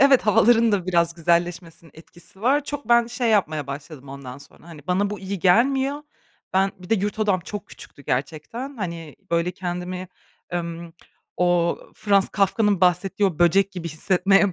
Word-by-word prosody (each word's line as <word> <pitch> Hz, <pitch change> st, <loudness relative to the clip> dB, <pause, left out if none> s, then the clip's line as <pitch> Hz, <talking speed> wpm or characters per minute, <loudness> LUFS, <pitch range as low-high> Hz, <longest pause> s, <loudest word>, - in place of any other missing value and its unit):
Evet, 275 Hz, -1 st, +6 dB
havaların 225 Hz, +1 st, +4 dB
da 190 Hz, -3 st, 0 dB
biraz 170 Hz, -2 st, +1 dB
güzelleşmesinin 170 Hz, -1 st, -1 dB
etkisi 175 Hz, +4 st, -17 dB
var. 275 Hz, +5 st, +2 dB
Çok 290 Hz, -5 st, -6 dB
ben 235 Hz, 0 st, +5 dB
şey 240 Hz, -1 st, -1 dB
yapmaya 155 Hz, -9 st, +1 dB
başladım 140 Hz, 0 st, -8 dB
ondan 135 Hz, -1 st, -9 dB
sonra, 160 Hz, -, -17 dB
hani, 155 Hz, -3 st, -12 dB
bana 195 Hz, +3 st, +1 dB
bu 210 Hz, -, -5 dB
iyi 195 Hz, 0 st, -4 dB
gelmiyor. 265 Hz, -, +2 dB, 0.5 s
Ben, 195 Hz, +1 st, +2 dB
bir 180 Hz, -, -13 dB
de -, -, +5 dB
yurt 205 Hz, +1 st, -2 dB
odam 200 Hz, -4 st, +1 dB
çok 205 Hz, +3 st, -7 dB
küçüktü 140 Hz, -, -14 dB
gerçekten. 160 Hz, -, -4 dB
Hani, 170 Hz, -6 st, -6 dB
böyle 170 Hz, +1 st, +1 dB
kendimi, 180 Hz, 0 st, -5 dB, 0.5 s
ımm, 170 Hz, -1 st, -5 dB, 0.4 s
o 175 Hz, -1 st, +2 dB, 0.2 s
Franz 200 Hz, -2 st, +2 dB
Kafka'nın 200 Hz, 0 st, +1 dB
bahsettiği 185 Hz, +3 st, +2 dB
o 165 Hz, -5 st, -8 dB
böcek 195 Hz, +3 st, +3 dB
gibi 170 Hz, -3 st, -5 dB
hissetmeye 190 Hz, +4 st, +2 dB
185 Hz, 160 wpm, -23 LUFS, 170-210 Hz, 0.5 s, Evet